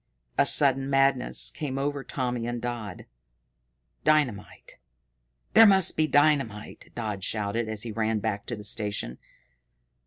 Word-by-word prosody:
A - - +3
sudden 135 -1 +3
madness 135 -2 +1
came 145 -4 -5
over 140 0 -2
Tommy 125 -4 -3
and 120 0 -3
Dodd. 115 -6 -6 1.0
"Dynamite 135 -10 -1 0.7
there 225 0 +8
must 190 -3 +5
be 155 0 +1
dynamite!" 140 -9 0
Dodd 105 -5 -4
shouted, 110 +2 -2
as 110 -1 -5
he 115 - -5
ran 110 0 -1
back 105 -1 -3
to 120 - -3
the 105 - -10
station. 105 - -2
120 Hz, 130 wpm, -26 LUFS, 105-140 Hz, 1.0 s, there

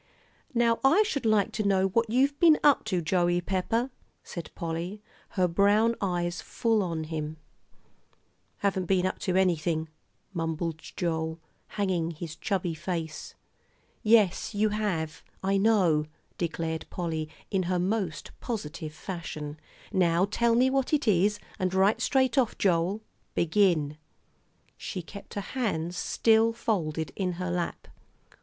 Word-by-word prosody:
"Now 230 -1 +3
I 330 +11 +6
should 280 - -1
like 215 -2 +3
to 215 - -2
know 195 -1 +3
what 230 +3 +1
you've 275 +5 +2
been 325 -3 +6
up 290 -5 +5
to, 185 -5 0
Joey 175 +1 +2
Pepper?" 195 +8 -1 0.3
said 170 -3 -7
Polly, 170 +5 -4 0.4
her 180 -1 +4
brown 205 +6 +4
eyes 175 -3 -1
full 225 -2 +1
on 165 -4 -2
him. 155 0 -4 1.3
"Haven't 190 -2 +1
been 185 -1 +2
up 185 - -2
to 180 - -1
anything," 165 -3 +1 0.4
mumbled 165 -1 -2
Joel, 160 -1 -3 0.4
hanging 185 -5 +1
his 165 -1 -7
chubby 185 -2 -1
face. 165 -1 -5 0.7
"Yes, 215 -2 +3
you 215 +1 +3
have, 185 -7 -2 0.2
I 195 +1 +2
know," 190 -8 +3 0.3
declared 165 -1 -2
Polly, 160 -3 -3 0.2
in 195 - +2
her 180 - +2
most 185 -2 -1
positive 160 -8 -5
fashion; 155 -4 -6 0.3
"now 175 -1 +3
tell 230 +3 +2
me 255 +2 +4
what 270 +2 0
it 295 -5 +2
is, 205 +1 +3 0.2
and 185 0 0
right 195 +3 +3
straight 265 -1 +3
off, 245 -4 +1
Joel. 185 +3 +1 0.3
Begin." 165 -4 +2 0.8
She 185 - -5
kept 200 +4 -11
her 205 - -1
hands 180 -8 -2
still 225 +4 +3
folded 160 -9 -1
in 185 -2 -1
her 180 0 -3
lap. 175 -1 -3
185 Hz, 135 wpm, -28 LUFS, 165-215 Hz, 1.3 s, I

